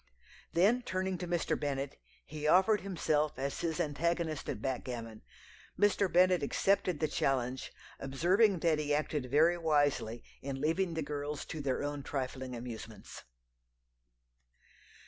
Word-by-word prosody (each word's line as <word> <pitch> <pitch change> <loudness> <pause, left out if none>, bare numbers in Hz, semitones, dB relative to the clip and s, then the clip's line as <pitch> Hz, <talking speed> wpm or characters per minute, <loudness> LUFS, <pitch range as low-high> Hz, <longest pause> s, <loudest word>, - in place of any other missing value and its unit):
"Then 205 +9 +4
turning 185 -4 -2
to 180 - -4
Mr. 175 -1 0
Bennet, 140 -1 -3 0.3
he 150 0 -4
offered 190 +5 +5
himself 155 -6 0
as 135 +1 -3
his 165 -2 -2
antagonist 160 +1 -1
at - - -3
backgammon. 120 -3 -4 0.6
Mr. 205 -2 +3
Bennet 180 0 +5
accepted 185 +2 +1
the 155 - +1
challenge, 130 -3 -1 0.3
observing 180 +8 +2
that 160 -3 +3
he 145 -1 +1
acted 150 -3 -2
very 160 +6 +4
wisely 145 -7 +1 0.2
in 135 -1 -4
leaving 165 +4 0
the 160 - -1
girls 145 0 -4
to 155 - -5
their 135 -1 -1
own 145 0 -3
trifling 130 -2 -4
amusements." 115 -2 -8
150 Hz, 130 wpm, -32 LUFS, 135-175 Hz, 0.6 s, offered